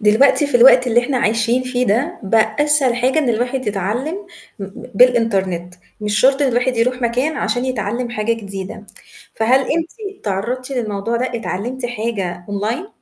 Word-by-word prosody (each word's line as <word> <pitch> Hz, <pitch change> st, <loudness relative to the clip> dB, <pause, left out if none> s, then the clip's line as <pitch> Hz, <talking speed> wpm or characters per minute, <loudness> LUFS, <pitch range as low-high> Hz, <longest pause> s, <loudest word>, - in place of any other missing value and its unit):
دلوقتي 230 Hz, +8 st, +4 dB
في 280 Hz, -, +2 dB
الوقت 250 Hz, +1 st, +7 dB
اللي 240 Hz, 0 st, +4 dB
إحنا 255 Hz, +2 st, -2 dB
عايشين 230 Hz, +3 st, +1 dB
فيه 250 Hz, 0 st, -1 dB
ده، 265 Hz, -, 0 dB
بقى 220 Hz, +1 st, +1 dB
أسهل 295 Hz, -4 st, +2 dB
حاجة 255 Hz, +5 st, +1 dB
إن 295 Hz, -5 st, +1 dB
الواحد 245 Hz, +2 st, -1 dB
يتعلِّم 210 Hz, -, -2 dB, 0.4 s
م 195 Hz, -, -5 dB
ب 195 Hz, -, -12 dB
بالإنترنت، 195 Hz, -7 st, +2 dB, 0.3 s
مش 210 Hz, 0 st, 0 dB
شرط 270 Hz, +3 st, +4 dB
إن 280 Hz, -, +3 dB
الواحد 245 Hz, +1 st, 0 dB
يروح 250 Hz, +2 st, 0 dB
مكان 250 Hz, +6 st, 0 dB
عشان 245 Hz, +1 st, -1 dB
يتعلِّم 240 Hz, -1 st, -2 dB
حاجة 230 Hz, -1 st, -1 dB
جديدة. 200 Hz, -2 st, -7 dB, 0.5 s
فهل 240 Hz, +4 st, +3 dB
أنتِ 380 Hz, -, -4 dB
تعرّضتِ 235 Hz, +6 st, -3 dB
للموضوع 230 Hz, -3 st, -2 dB
ده، 250 Hz, +2 st, 0 dB
اتعلِّمتي 235 Hz, +4 st, -4 dB
حاجة 205 Hz, -7 st, -4 dB
أونلاين؟ 215 Hz, -, -3 dB
240 Hz, 160 wpm, -18 LUFS, 210-255 Hz, 0.5 s, الوقت